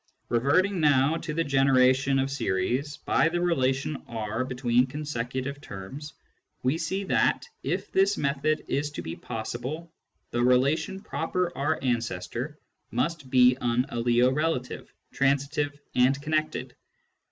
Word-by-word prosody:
Reverting 165 - +2
now 145 0 +4
to 165 -1 -5
the 165 +2 0
generation 135 -1 +3
of 135 0 0
series 125 +4 -1
by 165 - +2
the 175 +1 -1
relation 140 -4 0
R 110 +1 -3
between 125 -1 +1
consecutive 140 -1 -4
terms, 135 +9 -8 0.5
we 130 +6 +1
see 190 +5 -2
that, - - +2 0.2
if - - -3
this 195 +1 +3
method 145 +2 0
is 145 +1 -1
to - - -5
be 80 - -5
possible, 130 +9 -5 0.4
the 120 - 0
relation 140 +9 +2
" - - -21
proper 175 -1 -2
R 150 +3 0
ancestor 120 - -2 0.2
" - - -50
must 155 -6 -3
be 125 -1 +6
an 120 +1 +1
aliorela 125 +5 +2
tion, - - -8 0.3
transitive, 140 +1 0
and 130 +2 +3
connected. 155 -4 -2
135 Hz, 135 wpm, -27 LUFS, 125-155 Hz, 0.5 s, be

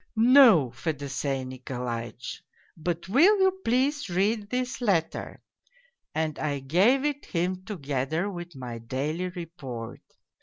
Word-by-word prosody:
' - - -46
' - - -43 0.3
No, 170 - +6
Fedosey 140 -1 -3
Nikolaitch, 125 -2 -5 0.3
but 170 +1 -3
will 340 - +5
you 380 0 +2
please 270 +2 +1
read 205 +4 0
this 250 +1 -2
letter,' 190 -9 -1 0.7
and 155 -1 -1
I 145 -2 -1
gave 190 - +3
it 290 -1 -1
him 180 +2 -1
together 155 - -2
with 175 -4 -7
my 125 -3 -6
daily 145 +10 -3
report. 155 - -7
165 Hz, 125 wpm, -27 LUFS, 135-215 Hz, 0.7 s, No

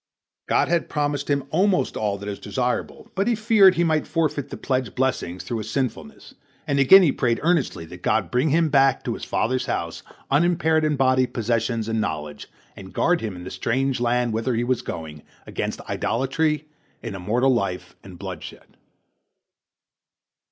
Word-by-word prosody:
God - - +2
had 170 -1 0
promised 145 -2 -1
him 140 -1 +1
almost 180 -5 +2
all 105 -2 -1
that 100 +1 -8
is 100 -1 -5
desirable, 125 -1 -3
but 195 +2 0
he 240 - +3
feared 215 -4 +5
he 170 - +2
might 160 -2 +1
forfeit 155 -4 -1
the - - -7
pledged 130 -5 -2
blessings 105 -9 -1
through 110 +5 -3
his 110 0 -6
sinfulness, 130 +1 -4 0.3
and 140 -2 0
again 185 +9 +8
he 155 - +4
prayed 120 -4 0
earnestly 160 - +1
that - - -12
God - - 0
bring 125 +5 +2
him 160 +2 +3
back 135 -2 +3
to - - -2
his - - -8
father's 130 +2 -1
house - - -3 0.3
unimpaired 160 +1 +3
in 155 -1 +1
body, 130 -1 +3
possessions, 115 -1 -1
and 110 -1 0
knowledge, 75 -7 -4 0.3
and 95 -1 -11
guard 175 0 +2
him, 105 -4 -4
in 90 - -9
the 90 - -7
strange 135 +2 -1
land 120 -1 +1
whither 115 +3 -1
he 115 - 0
was 125 0 0
going, 80 -3 -7 0.2
against - - -4
idolatry, 145 +5 -1 0.4
an - - -5
immoral 115 +8 +1
life, 90 -5 -3
and 95 -2 -11
bloodshed. 95 -3 -9
130 Hz, 175 wpm, -23 LUFS, 110-150 Hz, 0.4 s, again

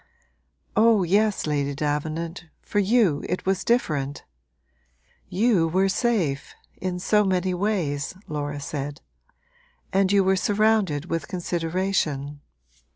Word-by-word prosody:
'Oh 220 -3 +5
yes, 205 +4 +2
Lady 145 -2 -1
Davenant 155 +4 -3
for 205 - -2
you 200 -7 +3
it 180 - -2
was 190 0 0
different. 150 - 0 1.1
You 195 -4 +3
were 190 +4 +2
safe, 190 - 0 0.2
in 180 -1 -3
so 210 +4 +3
many 185 -1 0
ways,' 180 -7 -1
Laura 145 -1 -3
said. 145 +1 -5 0.9
'And 195 0 +3
you 200 -1 +4
were 190 0 +3
surrounded 205 -6 +2
with 165 -4 -3
consideration.' 165 -5 -2
180 Hz, 110 wpm, -24 LUFS, 150-195 Hz, 1.1 s, Oh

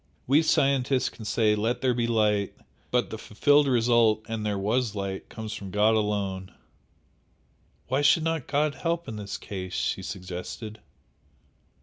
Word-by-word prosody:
We 140 +5 +4
scientists 135 -4 +2
can 110 - -11
say 110 0 +2
'Let 110 +3 -1
there 130 -1 +2
be 120 -1 0
light,' 105 -3 +1 0.3
but 125 -1 0
the 110 - -5
fulfilled 145 +8 +3
result 115 -3 +3
'and 110 -1 -3
there 105 -1 -1
was 110 +2 0
light' 100 -1 -4
comes 110 -1 -6
from 100 -3 -7
God 105 +3 +3
alone!" 100 -3 -1 1.4
"Why 130 +3 +1
should 145 +3 +4
not 165 -4 -1
God 150 +1 +1
help 170 +1 -2
in 110 - -6
this 100 -1 -5
case?" 95 -2 -6
she - - -1
suggested. 95 +4 -7
110 Hz, 150 wpm, -27 LUFS, 105-130 Hz, 1.4 s, We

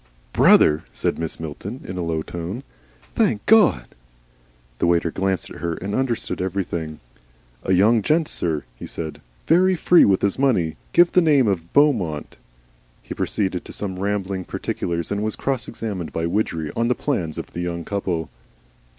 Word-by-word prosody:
"Brother!" 75 +1 +5
said - - -1
Mrs. 80 -1 -4
Milton, 90 - -6
in 90 - -5
a 90 - -3
low 80 -2 -1
tone. 85 +11 -6 0.5
"Thank 190 - +1
God!" 210 - +5 0.9
The - - +2
waiter 85 -1 +2
glanced 95 0 -2
at - - -9
her 85 -1 -2
and 100 +4 -5
understood 130 -6 -1
everything. 85 -4 -3 0.6
"A 95 - 0
young 110 +5 +4
gent, 155 +7 +2
sir," 80 -4 -1
he - - -9
said, 80 -2 -6 0.2
"very 185 +3 +4
free 175 +1 +5
with 95 -2 +3
his 100 +5 +1
money. 90 - +2 0.2
Give 175 0 +5
the 180 - +5
name 145 -7 +4
of 85 -4 -1
Beaumont." 110 - +1 0.7
He - - -6
proceeded 95 -4 -1
to - - -10
some 95 -3 -4
rambling 100 -1 -2
particulars, 85 -1 -3
and 100 0 -1
was 110 0 -1
cross 135 -3 -2
examined 100 -7 -5
by 80 - -2
Widgery 85 -4 -1
on 115 0 +1
the 125 - +2
plans 90 - -2
of - - -7
the 85 - -4
young 85 -1 -3
couple. 90 -5 -2
95 Hz, 165 wpm, -22 LUFS, 85-115 Hz, 0.9 s, Brother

